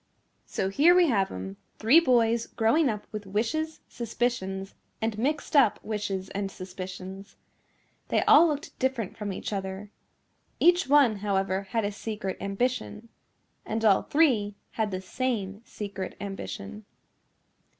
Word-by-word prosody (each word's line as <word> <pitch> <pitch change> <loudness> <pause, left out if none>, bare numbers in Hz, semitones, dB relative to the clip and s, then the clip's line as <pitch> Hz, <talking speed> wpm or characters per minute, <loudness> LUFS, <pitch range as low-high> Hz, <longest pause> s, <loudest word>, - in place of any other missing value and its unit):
So 190 - -1
here 310 - +5
we 355 -3 +5
have 195 -6 +1
'em, 95 +1 -6 0.2
three 240 +9 +6
boys 235 -6 +2
growing 250 +7 +2
up 210 -2 -4
with 210 -2 -6
wishes, 305 +11 -2
suspicions 210 -5 -3 0.3
and 220 -1 -1
mixed 290 +5 -1
up 260 -7 +5
wishes 200 -3 -3
and 195 0 -2
suspicions. 190 +1 -8 0.7
They - - +2
all 325 +4 +7
looked 300 0 -4
different 255 -6 -1
from 210 -2 -4
each 190 - -5
other. 195 +1 -5 0.7
Each 355 +2 +4
one, 270 -6 +5
however, 195 -1 -1
had 225 -3 0
a 205 - -1
secret 205 -2 -5
ambition. 225 +2 -2 0.5
And 225 +1 -2
all 200 -3 +5
three 240 -10 +2 0.2
had 220 -2 -1
the 185 -1 -4
same 205 -2 -3
secret 200 -3 -6
ambition. 100 - -6
210 Hz, 135 wpm, -27 LUFS, 195-250 Hz, 0.7 s, all